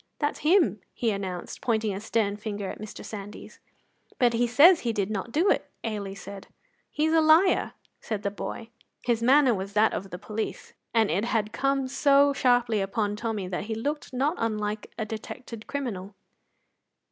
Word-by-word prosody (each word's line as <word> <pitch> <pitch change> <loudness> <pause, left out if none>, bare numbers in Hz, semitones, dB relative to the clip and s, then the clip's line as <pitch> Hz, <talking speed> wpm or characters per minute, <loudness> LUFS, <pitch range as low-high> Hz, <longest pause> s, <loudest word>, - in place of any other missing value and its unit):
"That's 290 -1 -1
him!" 305 - +3 0.2
he 230 -2 0
announced, 190 -3 -5
pointing 220 -3 0
a 195 - -5
stern 210 -2 0
finger 205 -2 -5
at - - -10
Mr. 215 - -8
Sandys. 205 -1 -9 0.6
"But 245 -2 +3
he 240 +1 +2
says 315 +9 +7
he 235 -2 -1
did 205 -1 -1
not 210 +2 -3
do 335 - +3
it," - - 0
Ailie 205 -3 -4
said. 195 0 -9 0.4
"He's 315 +1 0
a 325 - +5
liar," 315 +4 +4 0.3
said 215 -2 -4
the 200 - -1
boy. 225 +3 -6 0.3
His 235 -2 +1
manner 260 +1 +5
was 195 0 -4
that 215 +1 +4
of 195 - -4
the 180 - -6
police, 215 +4 -5 0.2
and 225 -6 +3
it 195 +7 0
had 220 -2 -1
come 275 -1 0
so 280 +1 +4
sharply 245 -5 +2
upon 205 +1 -1
Tommy 215 -3 -3
that 180 +1 -3
he 220 0 -3
looked 290 +7 -3
not 270 +5 +1
unlike 215 -1 -2
a 220 - -2
detected 220 +1 -8
criminal. 210 -9 -4
225 Hz, 175 wpm, -27 LUFS, 205-260 Hz, 0.6 s, says